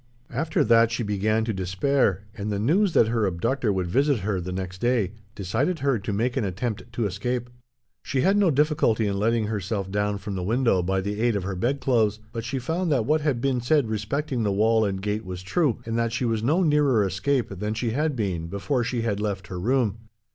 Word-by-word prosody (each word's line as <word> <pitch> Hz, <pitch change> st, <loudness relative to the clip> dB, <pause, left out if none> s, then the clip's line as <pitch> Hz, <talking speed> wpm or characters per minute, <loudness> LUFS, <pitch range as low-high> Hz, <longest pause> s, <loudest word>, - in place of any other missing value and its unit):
After 160 Hz, 0 st, 0 dB
that 115 Hz, 0 st, +5 dB
she 115 Hz, +1 st, -2 dB
began 110 Hz, +2 st, 0 dB
to 110 Hz, -, -1 dB
despair, 95 Hz, +3 st, +1 dB
and 105 Hz, -1 st, -4 dB
the 100 Hz, -, -1 dB
news 170 Hz, -, +2 dB
that 110 Hz, -, +4 dB
her 115 Hz, -3 st, +1 dB
abductor 110 Hz, +7 st, 0 dB
would 95 Hz, -2 st, -1 dB
visit 135 Hz, +6 st, +1 dB
her, 95 Hz, -1 st, -1 dB
the 90 Hz, +1 st, -5 dB
next 90 Hz, 0 st, -5 dB
day, 120 Hz, -6 st, +1 dB, 0.2 s
decided 115 Hz, -, -1 dB
her 135 Hz, -6 st, +1 dB
to 100 Hz, -, -4 dB
make 115 Hz, +5 st, 0 dB
an 130 Hz, -, 0 dB
attempt 110 Hz, +4 st, -4 dB
to 115 Hz, -1 st, -1 dB
escape. 120 Hz, +5 st, -3 dB, 0.5 s
She 130 Hz, -, -1 dB
had 195 Hz, +6 st, +3 dB
no 205 Hz, -3 st, +4 dB
difficulty 145 Hz, -7 st, +2 dB
in 100 Hz, -1 st, -1 dB
letting 115 Hz, +1 st, +1 dB
herself 100 Hz, -2 st, -3 dB
down 105 Hz, 0 st, 0 dB
from 100 Hz, +1 st, -6 dB
the 95 Hz, -, -3 dB
window 115 Hz, 0 st, +2 dB
by 95 Hz, +2 st, 0 dB
the 105 Hz, +2 st, -3 dB
aid 120 Hz, -2 st, +2 dB
of 100 Hz, -, -1 dB
her 95 Hz, 0 st, -3 dB
bedclothes, 115 Hz, -1 st, +1 dB
but 115 Hz, -1 st, -4 dB
she 135 Hz, +4 st, -3 dB
found 165 Hz, +7 st, -1 dB
that 125 Hz, -6 st, +2 dB
what 155 Hz, +4 st, +2 dB
had 140 Hz, -6 st, 0 dB
been 130 Hz, -2 st, +1 dB
said 130 Hz, -1 st, +2 dB
respecting 120 Hz, +5 st, -2 dB
the 105 Hz, -2 st, +1 dB
wall 110 Hz, +2 st, +3 dB
and 95 Hz, -1 st, -3 dB
gate 105 Hz, +1 st, -1 dB
was 90 Hz, -1 st, -7 dB
true, 135 Hz, -, +1 dB
and 115 Hz, 0 st, -1 dB
that 115 Hz, -1 st, 0 dB
she 120 Hz, +2 st, -1 dB
was 115 Hz, -2 st, 0 dB
no 155 Hz, +11 st, +2 dB
nearer 145 Hz, -, +3 dB
escape 115 Hz, +8 st, 0 dB
than 105 Hz, +3 st, -3 dB
she 115 Hz, +1 st, -1 dB
had 150 Hz, +4 st, 0 dB
been, 95 Hz, -8 st, -2 dB
before 120 Hz, +8 st, -1 dB
she 120 Hz, -1 st, -2 dB
had 105 Hz, -3 st, -1 dB
left 100 Hz, -4 st, -3 dB
her 90 Hz, -, -5 dB
room. 115 Hz, 0 st, +1 dB
110 Hz, 220 wpm, -25 LUFS, 100-130 Hz, 0.5 s, that